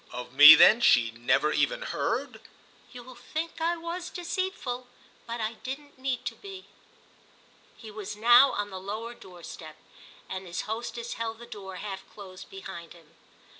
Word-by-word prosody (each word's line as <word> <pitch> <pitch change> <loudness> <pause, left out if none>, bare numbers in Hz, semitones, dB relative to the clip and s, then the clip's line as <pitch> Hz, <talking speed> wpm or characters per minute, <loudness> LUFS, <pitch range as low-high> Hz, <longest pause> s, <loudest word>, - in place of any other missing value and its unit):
"Of 125 0 -8
me 145 +3 +11
then 230 +2 +7
she 120 - +4
never 130 +6 +1
even - - 0
heard?" - - -3 0.5
"You'll 250 +1 -11
think 315 +7 -6
I 340 +1 0
was 340 +2 -6
deceitful. 345 -9 -4 0.4
But 235 +1 -5
I 220 +1 -2
didn't 280 +1 -8
need 260 -1 -3
to - - -3
be!" 390 -1 -11 1.1
He 220 -2 -11
was 210 -1 -7
now 240 +5 +6
on 205 0 -3
the 190 - -6
lower 220 +5 -6
door 180 -6 -15
step, 155 -1 -10 0.5
and 190 0 -6
his 170 - -4
hostess 235 +1 -5
held 225 -1 -4
the 235 - -11
door 200 -5 -9
half 195 0 -6
closed 190 -2 -12
behind 190 -4 -9
him. 165 -3 -20
225 Hz, 160 wpm, -27 LUFS, 190-260 Hz, 1.1 s, me